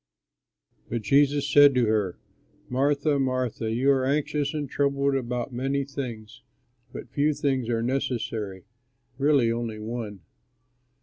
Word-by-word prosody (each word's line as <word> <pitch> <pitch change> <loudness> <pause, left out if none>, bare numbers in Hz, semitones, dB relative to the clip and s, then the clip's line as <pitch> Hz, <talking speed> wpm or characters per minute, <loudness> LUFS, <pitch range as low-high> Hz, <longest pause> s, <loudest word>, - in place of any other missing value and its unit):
But 115 -1 -3
Jesus 140 +5 +3
said 145 -1 +6
to 125 -2 +3
her, 105 -4 0 0.5
"Martha, 140 +3 +1
Martha, 130 -4 -1
you 130 +5 +3
are 135 -1 +2
anxious 145 +1 0
and 150 -2 -3
troubled 140 0 +1
about 125 -1 -2
many 135 +3 -1
things, 125 -6 -7 0.5
but 115 - -9
few 145 +2 +1
things 130 -5 -1
are 115 -1 0
necessary, 115 -6 -2 0.6
really 140 -5 +3
only 115 -2 -3
one. 110 -3 -6
130 Hz, 125 wpm, -26 LUFS, 115-140 Hz, 0.6 s, said